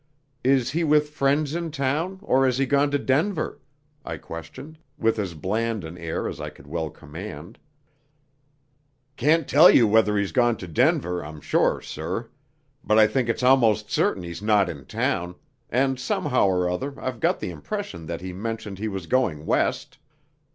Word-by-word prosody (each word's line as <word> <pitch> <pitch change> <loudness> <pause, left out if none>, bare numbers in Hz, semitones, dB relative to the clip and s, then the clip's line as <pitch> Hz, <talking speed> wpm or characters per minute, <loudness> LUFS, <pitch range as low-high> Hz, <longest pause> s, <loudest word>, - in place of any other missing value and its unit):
Is 130 -1 +2
he 165 +4 0
with 150 -1 +3
friends 145 +1 +1
in 170 0 -2
town, 155 +6 -1
or 135 -8 +3
has 125 -1 +1
he 135 - +2
gone 140 +2 +2
to 145 - +1
Denver?" 155 +6 0 0.4
I - - -5
questioned, 130 - -10 0.2
with 115 -1 +1
as 95 -5 -3
bland 110 +5 -2
an 80 +1 -8
air 85 -2 -3
as - - -6
I - - -4
could 65 - -17
well 80 +2 -3
command. 80 +4 -9 1.6
"Can't 150 +4 +2
tell 155 +6 +7
you 120 - +6
whether 105 -1 +3
he's 100 -1 0
gone 120 -3 +2
to 90 - -8
Denver, 90 +2 +1
I'm 75 +1 -9
sure, - - +1
sir. 90 +9 -5 0.5
But 105 - +2
I 110 - +8
think 120 +2 0
it's 115 - -1
almost 125 -5 +4
certain 90 - +1
he's 85 +1 -7
not 105 -3 +3
in 70 -6 -8
town, 90 +6 -2 0.3
and 130 +2 +1
somehow 130 -2 +1
or 90 -1 +1
other 135 +11 -3
I've 130 -2 -4
got - - +1
the - - -4
impression 80 +1 -6
that 85 +1 -5
he 90 0 -6
mentioned 105 -1 -5
he 110 - -2
was 95 -4 -5
going 85 -11 0
west." - - -1
110 Hz, 175 wpm, -24 LUFS, 90-135 Hz, 1.6 s, I